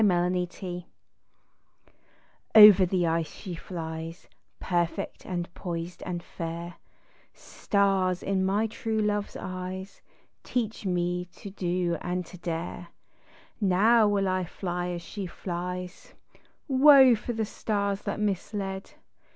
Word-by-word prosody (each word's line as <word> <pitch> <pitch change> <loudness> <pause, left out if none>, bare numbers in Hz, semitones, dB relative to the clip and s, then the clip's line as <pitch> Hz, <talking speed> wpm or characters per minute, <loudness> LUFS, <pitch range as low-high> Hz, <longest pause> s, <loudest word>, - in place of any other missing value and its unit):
Skating* 180 -1 0 1.7
Over 210 -3 +10
the 180 0 +1
tee 165 0 +2
she 180 +4 -8
flies 165 -1 -6 0.3
Perfect 175 +2 -2
and 175 -1 -4
poised 170 -1 -5
and 175 -1 -4
fair 170 +1 -6 0.3
— - - -32 0.2
Stars 195 -3 0
in 195 -1 0
my 200 +3 +2
true 220 0 -3
love's 210 -1 0
eyes 185 +1 -6 0.5
leach 225 -4 -1
me 180 0 0
to 195 +3 -11
do 175 -2 -1
and 180 0 -2
to 180 - -12
dare! 170 +1 -4 0.7
Now 210 +4 +5
will 200 -1 +1
1 185 -1 0
fly 175 0 -4
as 175 -1 -4
she 200 0 -6
flies 180 +1 -6 0.5
Woe 270 -2 +8
for 235 +2 -3
the 220 -1 -1
stars 200 -1 -2
that - - -3
misled. 195 -1 -3
185 Hz, 120 wpm, -27 LUFS, 175-205 Hz, 1.7 s, Over